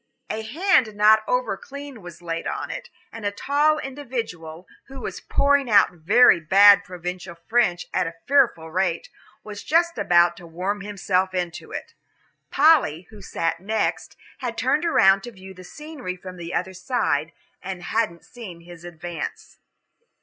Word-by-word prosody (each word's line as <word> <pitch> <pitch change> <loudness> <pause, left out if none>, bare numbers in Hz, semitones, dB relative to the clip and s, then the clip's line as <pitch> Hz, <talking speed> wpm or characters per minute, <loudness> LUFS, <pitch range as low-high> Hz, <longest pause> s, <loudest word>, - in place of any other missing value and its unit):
A 220 - -3
hand 255 - +1
not 215 +1 +6
over 250 -5 0
clean 280 +1 -10
was 175 -1 -12
laid 165 -1 -4
on - - -4
it, - - -7 0.2
and 225 - -9
a 205 - +1
tall 290 +8 +1
individual, 230 - -6 0.2
who 270 0 -10
was - - -6
pouring 280 -2 +2
out 205 -2 +5
very 180 +4 +5
bad 200 +5 +6
provincial 180 0 -7
French 220 -7 +1
at 185 -2 +1
a 165 - -7
fearful 240 - +2
rate, 180 -1 -1 0.3
was 210 -1 -8
just 335 +1 +1
about 175 0 +4
to 175 - -12
worm 185 +5 -3
himself 190 -2 -1
into 175 -2 -4
it. - - -7 0.6
Polly, 280 - +4
who 210 -2 -13
sat 165 -3 -2
next, 215 +4 -2 0.2
had 240 -3 -4
turned 295 +6 +1
around 195 - +4
to 240 - -9
view 190 -2 -12
the 185 0 -13
scenery 295 - -8
from 185 0 -10
the 170 0 -7
other 190 +1 -2
side, 180 - -1 0.3
and 185 -1 -6
hadn't 215 -7 -2
seen 200 -9 -11
his 175 0 -13
advance. 175 -1 -7
195 Hz, 155 wpm, -23 LUFS, 175-250 Hz, 0.6 s, not